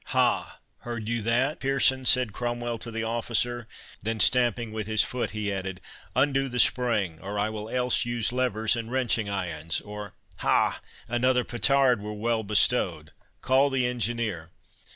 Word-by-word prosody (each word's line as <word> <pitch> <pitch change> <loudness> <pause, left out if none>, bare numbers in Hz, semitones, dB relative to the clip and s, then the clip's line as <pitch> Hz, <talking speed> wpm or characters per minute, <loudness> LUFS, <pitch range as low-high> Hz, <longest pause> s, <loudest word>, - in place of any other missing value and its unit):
"Ha! - - 0 0.2
heard 115 -3 -6
you 120 0 -1
that, 120 +7 0
Pearson?" 130 -1 +2
said 125 -5 +5
Cromwell 120 0 -4
to 115 - -5
the 115 0 -4
officer; 120 +1 -1 0.3
then, 110 +2 -3
stamping 120 -2 +4
with 110 -1 -5
his 110 -1 +4
foot, 125 -1 -3
he 105 -1 -3
added, 95 -1 -5 0.4
"Undo 135 +1 +1
the 125 - -5
spring, 115 -10 +3
or 100 +2 -6
I 105 +2 0
will 110 0 -7
else 125 -1 +1
use 120 -2 -1
levers 110 -4 +1
and 115 0 -6
wrenching 120 -5 0
irons—Or, 95 +2 -4 0.2
ha! - - +1 0.3
another 125 +1 +1
petard 125 0 +2
were 105 +1 -6
well 115 +1 -1
bestowed— 105 -1 +2 0.3
Call 135 +2 +3
the 130 -2 0
engineer." 115 -8 -2
115 Hz, 150 wpm, -26 LUFS, 105-125 Hz, 0.4 s, said